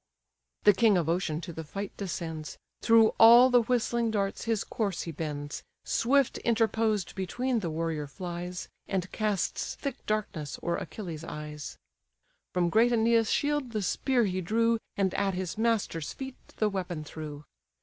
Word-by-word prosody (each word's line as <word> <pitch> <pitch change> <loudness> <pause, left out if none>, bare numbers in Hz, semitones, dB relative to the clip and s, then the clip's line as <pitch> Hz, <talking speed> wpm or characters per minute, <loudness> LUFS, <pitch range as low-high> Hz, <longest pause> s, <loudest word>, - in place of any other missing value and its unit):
The 205 - +7
king 215 -1 +4
of 170 -3 0
ocean 165 -2 0
to 170 -1 -7
the 160 - -6
fight 195 +6 -6
descends, 160 -6 -5 0.2
Through 225 -1 +6
all 240 +3 +9
the 245 -1 +6
whistling 235 0 +1
darts 200 -1 -1
his 225 -2 0
course 200 -5 -2
he 165 - -5
bends, 145 -2 -5 0.2
Swift 270 +2 +2
interposed 220 -3 +1
between 240 +7 -1
the 175 -5 -3
warrior 160 -2 -2
flies, 180 +3 -6 0.2
And 185 -2 -2
casts 210 -3 -1
thick 275 -2 -5
darkness 195 -9 -2
o'er 170 0 0
Achilles' 170 -7 -6
eyes. 150 -2 -7 0.7
From 175 -1 +1
great 230 +5 +4
Æneas' 230 -1 +3
shield 290 -4 0
the 215 -2 -1
spear 250 +5 +1
he 185 -1 -1
drew, 230 +5 +2 0.2
And 190 -2 +1
at 195 -2 0
his 180 -2 -3
master's 220 -8 0
feet 265 -1 -7 0.2
the 215 - +2
weapon 180 -5 -3
threw. 150 -1 -8
195 Hz, 155 wpm, -29 LUFS, 165-230 Hz, 0.7 s, all